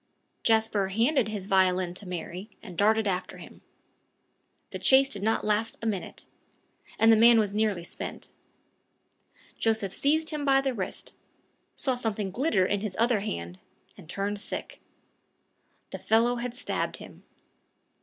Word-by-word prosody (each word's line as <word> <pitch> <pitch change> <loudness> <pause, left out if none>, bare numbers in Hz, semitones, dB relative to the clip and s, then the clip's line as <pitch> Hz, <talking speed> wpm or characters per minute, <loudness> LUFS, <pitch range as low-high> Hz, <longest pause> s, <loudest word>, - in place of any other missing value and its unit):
Jasper 220 -3 +2
handed 230 +5 +2
his 210 -3 -5
violin 185 -2 +2
to 190 +2 -8
Mary, 180 +3 -6
and 185 -6 -9
darted 215 +3 +3
after 185 -1 -3
him. - - -13 1.1
The - - -5
chase 270 0 +5
did 205 -8 -5
not 220 +2 0
last 215 +1 0
a - - -7
minute; 205 -5 -4 0.7
the 225 0 +6
man 230 +1 +7
was 210 -3 +1
nearly 210 -4 0
spent. - - -6 1.3
Joseph 220 -4 0
seized 315 +3 +1
him 300 -1 -3
by 270 -1 +4
the 270 -1 -1
wrist, 195 -6 -6 0.6
saw 265 - 0
something 220 -5 -3
glitter 220 - +1
in 205 +1 -1
his 205 -3 -4
other 235 -1 +3
hand, 90 - -5 0.4
and 160 - -15
turned 200 +2 -3
sick. 215 - -6 1.1
The - - -6
fellow 235 +2 +2
had 240 0 -4
stabbed - - -3
him. - - -13
215 Hz, 145 wpm, -27 LUFS, 195-235 Hz, 1.3 s, man